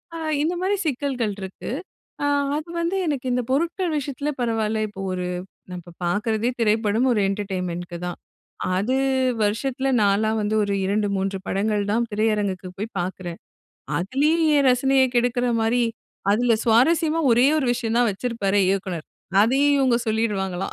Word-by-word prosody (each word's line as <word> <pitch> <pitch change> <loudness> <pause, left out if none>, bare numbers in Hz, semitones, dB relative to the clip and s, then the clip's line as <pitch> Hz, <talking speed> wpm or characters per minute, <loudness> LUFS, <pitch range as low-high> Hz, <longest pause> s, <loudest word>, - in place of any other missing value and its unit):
அ - - -4 0.3
இந்த 340 +3 0
மாரி 385 +2 +1
சிக்கல்கள் 255 -6 -1
இருக்கு. 190 +4 -7 0.5
அ - - +2 0.3
அது 310 - -6
வந்து 340 +3 -1
எனக்கு 275 -4 -2
இந்த 250 - +1
பொருட்கள் 335 +4 0
விஷயத்துல 285 +1 -3
பரவால்ல, 220 -2 0
இப்போ 195 -1 -9
ஒரு 180 0 -3 0.4
நா 180 - -6
இப்ப 175 0 -14
பாக்குறதே 215 +5 0
திரைப்படம் 220 +2 +2
ஒரு 210 - +1
என்டர்டைன்மென்ட்க்கு 180 -3 -4
தான். 175 - -4 0.6
அது 220 +7 0 0.5
வருஷத்துல 260 +6 -1 0.2
நாலா 205 +2 +2
வந்து 210 +1 0
ஒரு 200 0 -1
2 205 +1 +1
3 195 0 -1
படங்கள் 205 +1 0
தான் 235 +2 +1
திரையரங்குக்கு 205 -4 0
போயி 210 +3 -3
பாக்குறேன். 175 -1 -5 0.6
அதுலயும் 295 - +1
என் 280 -1 +3
ரசனைய 265 +1 +3
கெடுக்குற 245 +1 +1 0.2
மாரி 240 +2 +2 0.5
அதுல 235 +3 +3
சுவாரசியமா 315 +8 +3
ஒரே 240 +3 +5
ஒரு 265 - 0
விஷயம் 235 -1 -2
தான் 240 -2 +4
வச்சிருப்பாரே 205 -2 0
இயக்குனர். 185 -4 -2 0.4
அதையும் 280 +5 +3
இவுங்க 255 -3 +3
சொல்லிருவாங்களாம். 195 -4 -1
225 Hz, 145 wpm, -23 LUFS, 200-265 Hz, 0.6 s, ஒரே